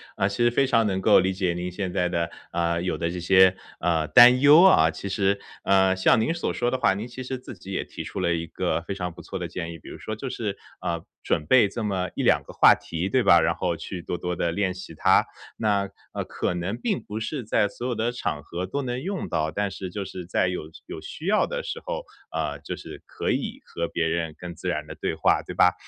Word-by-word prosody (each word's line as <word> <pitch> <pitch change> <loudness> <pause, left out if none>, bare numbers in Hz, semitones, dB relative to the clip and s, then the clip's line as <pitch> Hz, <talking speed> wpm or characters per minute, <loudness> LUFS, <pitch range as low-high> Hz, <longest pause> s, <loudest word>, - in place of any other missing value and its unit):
啊， 95 - +1
其 100 +4 -1
实 120 - +4
非 135 +3 +2
常 115 -3 +3
能 95 -2 0
够 - - +6
理 95 +1 +1
解 95 -2 0
您 90 +1 -4
现 95 0 -3
在 90 -1 +1
的， 85 -1 -1 0.2
呃， 85 0 0
有 90 - -1
的 85 - -1
这 90 +1 -4
些， 95 +1 +5 0.2
呃， 80 -2 +1
担 125 +5 +8
忧 145 +4 +8
啊。 80 - +6
其 100 - -6
实， 100 0 +1 0.2
呃， 95 -1 +4
像 95 +4 +4
您 130 - +1
所 170 - -2
说 120 - 0
的 130 - 0
话， 95 - +3
您 105 +4 -5
其 125 +1 -8
实 130 +1 -4
自 125 - -10
己 95 +1 -11
也 95 - -1
提 - - -8
出 - - -6
了 85 -2 +1
一 85 0 -2
个 85 - -2
非 85 - -5
常 90 -2 -4
不 85 - -12
错 95 - -6
的 90 - -3
建 85 0 -5
议。 85 - -10
比 - - -12
如 - - -8
说 110 - -5
就 130 +5 -5
是， 105 -5 -3 0.3
呃， 85 -1 -2 0.2
准 75 - 0
备 125 -1 +6
这 110 +3 -5
么 95 -3 -1
1-2 - - +3
个 - - -12
话 - - +7
题， 85 +3 -4
对 125 +4 +2
吧？ 85 -5 +6
然 - - +1
后 90 -2 -1
去 85 +2 -7
多 90 - -3
多 90 0 -2
地 85 -1 0
练 95 +2 0
习 95 -2 -9
它。 - - +4 0.3
那 100 -3 +1 0.2
呃， - - -2
可 - - -2
能 90 +5 -3
并 205 - -1
不 105 +1 -5
是 130 +4 -4
在 105 -1 +2
所 120 +5 -6
有 125 - -1
的 115 +2 0
场 75 -11 -3
合 85 +4 -5
都 140 +9 -3
能 125 0 -3
用 190 +2 -3
到， 80 -1 0
但 100 +2 -1
是 95 -1 -6
就 100 +2 -5
是 90 -2 -8
在 95 - +1
有 90 -4 -4 0.2
有 80 - -7
需 160 - -9
要 210 +3 +3
的 - - -4
时 - - -5
候， - - -4 0.3
呃， - - -2
就 - - -5
是 - - -10
可 - - -2
以 235 +4 -3
和 85 0 -3
别 85 - -1
人 80 -1 -2
更 90 -1 -7
自 80 - -7
然 - - -2
地 - - -8
对 - - -3
话， - - +3
对 - - -8
吧？ - - +5
95 Hz, 275 characters per minute, -25 LUFS, 85-120 Hz, 0.3 s, 担